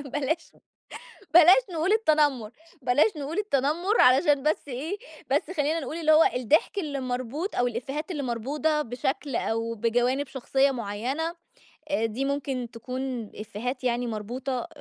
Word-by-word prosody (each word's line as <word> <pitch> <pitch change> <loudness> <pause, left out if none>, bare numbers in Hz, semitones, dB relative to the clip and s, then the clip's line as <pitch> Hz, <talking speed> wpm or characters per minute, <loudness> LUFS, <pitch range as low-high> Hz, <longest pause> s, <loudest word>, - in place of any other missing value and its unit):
بلاش 305 +4 -2 0.8
بلاش 355 +8 +8
نقول 335 +5 +1
التنمّر، 295 - +2 0.3
بلاش 300 - +3
نقول 295 +6 -4
التنمّر 345 - +1
علشان 270 +2 +5
بس 300 -1 0
إيه 290 +10 -4 0.3
بس - - +1
خلّينا 305 +2 +1
نقول 300 +3 -5
اللي 315 -2 +3
هو 310 +1 +7
الضحك 295 - +2
اللي 290 -6 -3
مربوط 255 - -3
أو 245 - +2
الإفيهات 270 +8 -4
اللي 295 -5 -3
مربوطة 290 +6 -1
بشكل، 255 +2 -3
أو 230 +1 -1
بجوانب 245 +5 +1
شخصيّة 270 +1 +1
معيّنة، 255 +8 -3 0.6
آآ، 225 -6 +1
دي 235 +5 -2
ممكن 270 -3 -2
تكون 250 -1 -5
إفيهات 245 +5 -5
يعني 245 0 0
مربوطة، 245 +7 -4
270 Hz, 140 wpm, -26 LUFS, 245-310 Hz, 0.8 s, بلاش